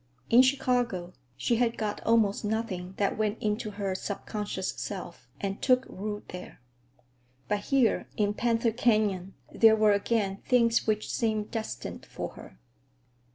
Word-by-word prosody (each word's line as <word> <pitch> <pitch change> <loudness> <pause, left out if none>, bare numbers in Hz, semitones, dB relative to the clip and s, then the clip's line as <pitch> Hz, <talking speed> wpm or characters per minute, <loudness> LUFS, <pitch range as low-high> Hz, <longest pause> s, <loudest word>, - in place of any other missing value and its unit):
In 240 +2 +9
Chicago 245 -9 +1 0.2
she 235 - +1
had 235 -1 +1
got 210 -2 -2
almost 225 -3 +3
nothing 205 -4 -3
that 205 +1 0
went 215 0 0
into 215 +1 -1
her 200 -2 -3
subconscious 200 0 -4
self 175 -9 -7
and 195 0 -3
took 255 0 +3
root 205 +2 -6
there. 180 - -9 0.9
But 205 -1 -1
here, 270 -4 +2
in 205 -1 +2
Panther 230 +1 +1
Canyon, 210 -5 +1 0.2
there 225 -1 +6
were 215 -1 +4
again 200 -1 0
things 235 -1 +2
which 215 0 0
seemed 215 -2 -1
destined 225 -1 -5
for - - -5
her. - - -13
215 Hz, 140 wpm, -28 LUFS, 200-230 Hz, 0.9 s, In